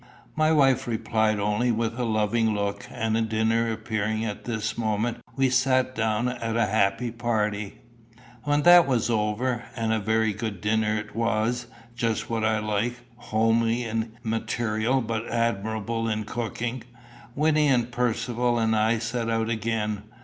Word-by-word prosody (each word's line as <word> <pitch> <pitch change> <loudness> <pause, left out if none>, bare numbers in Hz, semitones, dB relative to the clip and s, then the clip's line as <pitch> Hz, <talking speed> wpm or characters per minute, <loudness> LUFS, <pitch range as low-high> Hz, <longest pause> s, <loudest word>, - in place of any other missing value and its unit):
My 155 0 +3
wife 135 -5 +3
replied 110 -2 0
only 105 +4 +1
with 115 +1 -2
a 125 - 0
loving 110 0 +1
look, 100 0 -3
and 110 0 -1
dinner 115 +1 +1
appearing 110 0 -2
at 105 -2 -5
this 110 -3 -2
moment, 110 +1 -1 0.2
we 135 -1 +2
sat 130 0 +2
down 110 0 0
a 115 -2 0
happy 105 +3 +1
party. 105 -3 -2 0.6
When 145 0 +1
that 175 -2 +8
was 120 -3 +1
over 115 +3 0
and 115 -2 0
a 110 - +1
very 110 +1 +1
good 110 -3 -4
dinner 105 +1 +1
it 105 0 -7
was, 115 +1 0 0.3
just 115 -1 -1
what 115 -1 -1
I 110 0 +2
like, 105 +3 -1 0.2
homely 115 0 +1
in 115 -1 -3
material 115 +2 0
but 115 0 -3
admirable 115 0 -1
in 110 0 -1
cooking 120 +2 -4 0.5
Wynnie 150 0 +3
and 125 -3 +2
Percivale 120 0 0
and 110 -1 +2
I 110 +2 +2
set 115 +1 -2
out 115 0 0
again. 110 -2 -1
115 Hz, 150 wpm, -26 LUFS, 110-120 Hz, 0.6 s, that